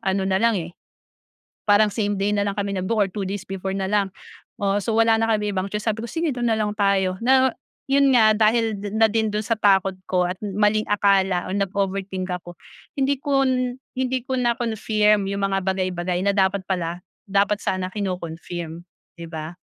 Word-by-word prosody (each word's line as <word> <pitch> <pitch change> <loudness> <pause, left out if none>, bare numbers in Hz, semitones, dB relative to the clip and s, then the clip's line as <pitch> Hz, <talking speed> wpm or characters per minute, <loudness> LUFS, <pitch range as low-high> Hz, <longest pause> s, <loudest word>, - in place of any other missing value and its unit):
ano 190 0 0
na 190 0 +1
lang 230 -2 +3
eh, 170 -1 -5 0.9
parang 210 +1 +5
same 205 -1 -2
day 205 +1 +1
na 200 - +1
lang 200 -1 -2
kami 200 0 -2
nag-book 190 +4 -1
or 200 - +3
2 195 +1 -5
days 195 0 -5
before 190 0 -4
na 195 -1 -2
lang, 200 -2 +1 0.5
oo. 200 0 0
So, 225 - -1
wala 225 0 +5
na 225 0 +1
kami 210 -2 0
ibang 190 +1 -2
choice, 210 +2 -4
sabi 220 +1 -1
ko, - - -4
"Sige 325 -5 -1
do'n 240 -2 0
na 220 - +1
lang 210 -1 -1
tayo", 195 -2 +2
na, 260 0 +4 0.3
'yon 275 0 +4
nga, 220 -3 +5
dahil 225 0 +2 0.2
na 225 0 +5
din 220 0 0
do'n 210 +1 -2
sa 230 - +2
takot 195 -3 +3
ko, 180 -1 +1
at 180 - -3
maling 210 +1 +1
akala, 195 -3 +2
nag-overthink 195 -1 -2
ako. 175 -1 -11 0.4
Hindi 275 +1 +2
kon 260 -3 +1 0.2
hindi 260 0 0
ko 260 - -1
na-confirm 220 -4 +1
yung 200 0 -3
mga 195 -1 -1
bagay-bagay, 185 -2 -1
na 200 - +2
dapat 190 0 +1
pala, 175 -2 -2 0.2
dapat 200 +1 +1
sana 185 -1 -1
kino-confirm, 175 -3 -5 0.3
'di 170 -1 -8
ba? 160 +2 -6
200 Hz, 190 wpm, -23 LUFS, 190-220 Hz, 0.9 s, parang